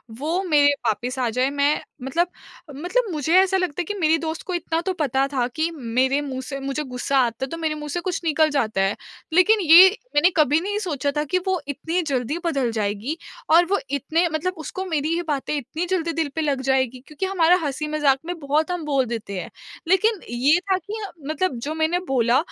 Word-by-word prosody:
वो 305 +11 -2
मेरे 290 -5 +4
वापस 245 +4 -1
आ 250 - +1
जाए। 255 +4 +1
मैं 285 +1 +1 0.2
मतलब 335 +7 0 0.5
मतलब 390 - -1
मुझे 305 +1 -1
ऐसा 385 0 +2
लगता 360 -3 -1
है - - -1
कि 415 - -4
मेरी 320 0 +3
दोस्त 320 -1 -4
को 370 - -3
इतना 330 -1 -1
तो 375 +2 -2
पता 275 -5 +1
था 250 -3 +1
कि 320 +2 0 0.3
मेरे 265 +2 +2
मुँह 270 -3 -4
से 275 +1 -6
मुझे 275 +2 -3
गुस्सा 265 0 -1
आता 245 0 +1
है - - -5
तो 330 - -4
मेरे 320 -2 -1
मुँह 300 0 -7
से 350 - -2
कुछ 360 0 -3
निकल 315 0 +3
जाता 220 -9 0
है, 195 +1 +1 0.4
लेकिन 415 +6 +5
ये 350 +2 +9 0.3
मैंने 325 +5 +5
कभी 300 0 +4
नहीं 410 +4 -2
सोचा 295 -8 -2
था 295 - +1
कि 365 +5 0
वो 375 -2 +1
इतनी 325 +5 -2
जल्दी 280 0 -2
बदल 275 -8 0
जाएगी 215 +6 -2 0.3
और 335 +2 +7
वो 400 - +3
इतने 310 +5 +1
मतलब 350 +4 -1
उसको 345 +5 -5
मेरी 320 -3 -1
ये 345 - -1
बातें 285 -1 -1
इतनी 290 +6 -4
जल्दी 335 -3 0
दिल 320 -2 -1
पे 320 - -1
लग 285 -4 0
जाएँगी 260 -1 0
क्योंकि 305 +5 -4
हमारा 360 -2 +4
हँसी-मज़ाक 295 -1 +1
में 350 0 -4
बहुत 300 +3 0
हम 355 -3 -3
बोल 275 -3 +1
देते 220 -4 -5
हैं। - - -8 0.4
लेकिन 390 +3 +3
ये 270 +8 +3
था 380 - +4
कि 375 +3 -10
ह 410 - -3 0.2
मतलब 315 0 0
जो 305 +2 -3
मैंने 320 +2 +1
बोला 245 -1 +3
305 Hz, 215 wpm, -23 LUFS, 270-345 Hz, 0.5 s, ये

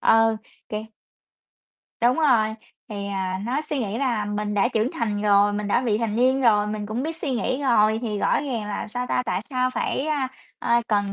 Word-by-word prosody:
ờ, 225 0 +4 0.3
kiểu 215 0 -4 1.2
Đúng 245 +5 +4
rồi, 230 -8 +3 0.3
thì, 200 -2 -5
à, 190 -1 -2
nó 255 +6 0
suy 300 -2 -2
nghĩ 215 -2 -2
là 240 -6 0
mình 210 0 -2
đã 205 +4 +3
trưởng 225 0 0
thành 210 -4 -2
rồi, 205 0 +4
mình 205 0 -3
đã 235 - +3
vị 220 -4 +1
thành 225 -2 -1
niên 260 +2 +3
rồi, 210 -4 +4
mình 210 0 -4
cũng 220 +5 -3
biết 320 +1 -3
suy 310 -4 -3
nghĩ 255 +2 -1
rồi 220 -4 +3
thì 210 -3 -2
rõ - - +2
ràng 240 -7 -3
là, 205 +1 -4
sao 245 +3 -3
ta, 250 - 0
tại 185 +1 -1
sao 255 0 -1
phải, 270 +3 -2
a, 285 -4 0 0.3
a, 235 0 +2
cần 205 -2 +1
225 Hz, 210 wpm, -24 LUFS, 210-255 Hz, 1.2 s, ờ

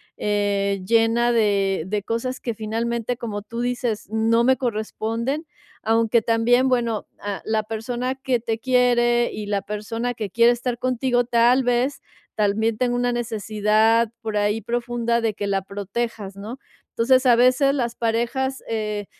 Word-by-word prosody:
eh, 200 -1 0
llena 230 +2 +3
de 200 -5 +1
de 205 +1 -2
cosas 230 +4 -3
que 235 - -3
finalmente, 230 +2 -2
como 215 -4 -5
tú 230 +3 -7
dices: 245 -3 -2
"No 225 +2 +2
me 260 +1 +5
corresponden". 235 +4 -3 0.4
Aunque 225 +1 +2
también, 235 +3 +3
bueno, 235 -4 0
a 205 -1 -4
la 220 0 0
persona 240 +4 -3
que 265 -2 -1
te 225 -1 -2
quiere 240 -1 +2
y 210 - -5
la 200 -1 0
persona 225 +4 -4
que 220 -4 -5
quiere 235 +4 +4
estar 240 0 -2
contigo, 250 0 +1
tal 240 +2 +3
vez, 245 +3 0 0.3
también 215 +1 +1
tenga 245 0 0
una 245 0 +1
necesidad 220 0 +1
por 220 -2 -4
ahí 205 +1 +1
profunda 235 +1 -1
de 225 -2 0
que 205 0 -4
la 195 -1 0
protejas, 200 +1 -5
¿no? 210 +6 -7 0.3
Entonces, 255 +3 +3
a 245 -2 +6
veces 255 +3 +4
las 240 -4 -2
parejas, 240 +4 -1
eh, 210 -2 -3
230 Hz, 155 wpm, -22 LUFS, 215-245 Hz, 0.4 s, a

